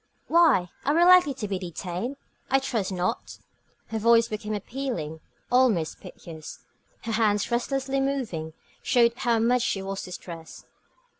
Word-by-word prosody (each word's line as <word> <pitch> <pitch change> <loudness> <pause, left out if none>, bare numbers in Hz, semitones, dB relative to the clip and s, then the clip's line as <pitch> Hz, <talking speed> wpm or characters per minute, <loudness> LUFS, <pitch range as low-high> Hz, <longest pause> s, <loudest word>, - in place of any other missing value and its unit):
"Why, 310 - +4
are 290 - +1
we 340 - +5
likely 360 -6 +6
to 220 -5 -4
be 195 -2 -2
detained? 180 - -5 0.3
I 270 - +4
trust 230 -7 -2
not." 185 +5 -3 0.5
Her 220 - -2
voice 230 +1 +5
became 215 0 -3
appealing, 205 - -4 0.3
almost 240 -11 +2
piteous. 160 -2 -10 0.5
Her 230 - -3
hands, 215 -1 +1
restlessly 270 +3 0
moving, 230 - -2 0.3
showed 235 -1 +3
how 240 -1 +1
much 240 +2 +2
she 200 -5 -1
was 195 0 -4
distressed. 170 -2 -9
225 Hz, 140 wpm, -26 LUFS, 185-260 Hz, 0.5 s, likely